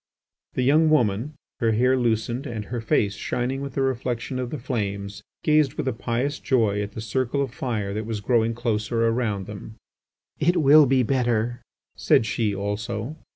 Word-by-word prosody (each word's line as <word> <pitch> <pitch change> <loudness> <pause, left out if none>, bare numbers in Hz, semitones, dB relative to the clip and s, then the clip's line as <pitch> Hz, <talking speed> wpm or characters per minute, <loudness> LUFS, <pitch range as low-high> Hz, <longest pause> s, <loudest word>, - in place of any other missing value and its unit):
The 130 - +1
young 155 +5 +4
woman, 125 0 +1 0.2
her 115 -2 +2
hair 125 +4 +3
loosened 120 +2 0
and 110 -4 -5
her 120 +1 -4
face 105 -2 +1
shining 125 +5 -2
with 140 -2 -6
the 135 - +1
reflection 130 -1 -2
of 125 -1 -3
the 150 - -4
flames, 100 -6 -4 0.2
gazed 150 -3 +3
with - - -3
a 130 - +1
pious 120 +5 -2
joy 110 -6 +1
at 100 0 -5
the 110 - -6
circle 125 +4 -1
of 135 -3 -1
fire 110 -7 -3
that 110 +1 -4
was 110 -2 -3
growing 115 +1 +1
closer 115 0 0
around 110 -4 -1
them. 105 +2 -9 0.6
"It 175 +4 +2
will 150 -1 +7
be 130 0 +3
better," 120 -1 0 0.3
said 110 - +3
she 105 -1 -1
also. 105 +6 -3
120 Hz, 175 wpm, -24 LUFS, 110-130 Hz, 0.6 s, will